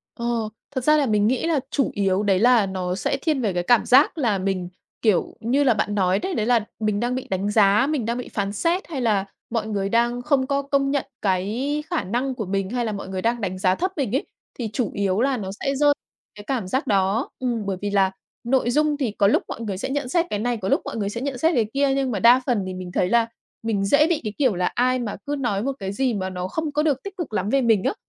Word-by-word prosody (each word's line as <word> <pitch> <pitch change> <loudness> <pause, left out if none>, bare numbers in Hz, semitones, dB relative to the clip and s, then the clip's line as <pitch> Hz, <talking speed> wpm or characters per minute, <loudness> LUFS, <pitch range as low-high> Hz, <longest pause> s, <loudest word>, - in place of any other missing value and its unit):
Ờ, 235 - -5 0.5
thật 260 -3 -3
ra 305 +2 +5
là 290 - +2
mình 210 -2 +2
nghĩ 255 +6 0
là 320 -4 +2
chủ 275 - +1
yếu 195 0 +1
đấy 195 -3 +2
là 235 -2 +5
nó 185 -1 -3
sẽ 195 +7 -1
thiên 305 -5 0
về 205 -6 0
cái 175 - -1
cảm 240 +5 +4
giác 275 +6 +5
là 230 -9 +1
mình, 185 -2 -2 0.3
kiểu 210 -7 +1
như 260 +6 +1
là 255 -4 +4
bạn 210 -1 -1
nói 190 -1 +2
đấy, 375 - -3
đấy 215 - 0
là 230 -3 +2
mình 215 -2 0
đang 245 +2 -1
bị 260 - -5
đánh 195 +2 -1
giá, 210 +4 +4
mình 285 -7 -1
đang 235 +2 -1
bị 250 - -5
phán 200 -1 -2
xét 340 - 0
hay 285 -6 -4
là 210 -4 +1 0.2
mọi 225 -2 -2
người 200 -2 -1
đang 240 +2 +1
không 265 -1 +1
có 280 0 +1
công 275 0 0
nhận 280 -2 0 0.2
cái 220 +11 -1
khả 345 - 0
năng 250 +7 -2
của 220 -5 -4
mình 195 0 -2
hay 245 0 -1
là 220 - -1
mọi 200 -2 -6
người 190 -1 -3
đang 235 +1 0
đánh 185 -2 -2
giá 185 0 +3
thấp 370 - -1
mình 260 -4 -1
ấy, - - 0 0.3
thì 225 -3 -2
chủ 240 -7 -1
yếu 200 +1 0
là 270 -1 +2
nó 195 -4 -5
sẽ 275 0 -1
rơi 295 +2 +3
vào 290 - +6 0.4
cái 205 - -10
cảm 245 -8 -1
giác 260 +10 -1
đó. 200 +4 +1
Ừm, 240 -5 -2
bởi 195 -2 -2
vì 205 - -2
là 195 -2 +3 0.3
nội 245 0 +1
dung 300 +1 +2
thì 260 -6 -1
có 200 -1 +2
lúc - - +3
mọi - - -6
người 200 -4 -3
sẽ 215 - -4
nhận 275 -2 -2
xét 340 +3 +2
cái 205 - -2
này, 240 +1 -1
có 195 -1 -3
lúc - - +2
mọi - - -5
người 205 -2 -1
sẽ 235 +3 -5
nhận 275 -2 -3
xét 320 +7 +3
cái 230 -3 +3
kia, 275 0 +2
nhưng 270 -2 0
mà 205 - -1
đa 245 +4 +6
phần 235 -7 +1
thì 185 - -4
mình 185 -1 -7
thấy 180 0 +1
là 230 0 +3 0.4
mình 205 -3 0
dễ 290 +9 +4
bị 340 -4 0
cái 215 -2 -4
kiểu 260 -8 +2
là 180 0 0
ai 255 +1 +2
mà 225 -4 -3
cứ 290 0 -2
nói 210 -5 -1
một 275 - 0
cái 195 0 -3
gì 255 +2 0
mà 190 -2 -2
nó 180 -1 -4
không 310 +8 -3
có 300 +1 +1
được 285 -4 0
tích 395 0 -8
cực 330 - -5
lắm 195 0 -1
về 275 +3 +3
mình 225 -5 +3
á, - - +1
230 Hz, 280 wpm, -23 LUFS, 200-270 Hz, 0.5 s, vào